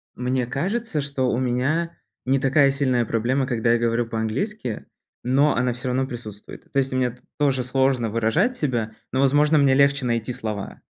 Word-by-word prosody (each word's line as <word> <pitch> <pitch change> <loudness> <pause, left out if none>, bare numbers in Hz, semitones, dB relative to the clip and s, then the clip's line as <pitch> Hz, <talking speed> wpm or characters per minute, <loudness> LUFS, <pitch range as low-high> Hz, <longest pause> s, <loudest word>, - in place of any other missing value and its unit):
мне 125 0 -1
кажется, 185 - -2
что 140 -3 -1
у - - 0
меня 130 +7 -1 0.3
не 135 +1 +2
такая 135 +1 +4
сильная 130 -3 +1
проблема, 125 +5 0
когда 115 -3 +1
я 120 - +2
говорю 115 0 0
по-английски, 115 - -3 0.4
но 140 +4 +3
она 125 -1 +1
всё 125 +2 -4
равно 130 +1 0
присутствует. 110 -5 -10
То - - -3
есть 135 -1 -1
мне 130 -1 +1
т 125 - -19 0.2
тоже 135 -3 +1
сложно 130 -2 +1
выражать 115 - +1
себя, 120 - -2 0.2
но, 130 - -1
возможно, 145 +3 +4
мне 140 -2 +4
легче 140 0 +3
найти 115 0 -1
слова. 105 -4 -6
130 Hz, 175 wpm, -23 LUFS, 120-140 Hz, 0.4 s, такая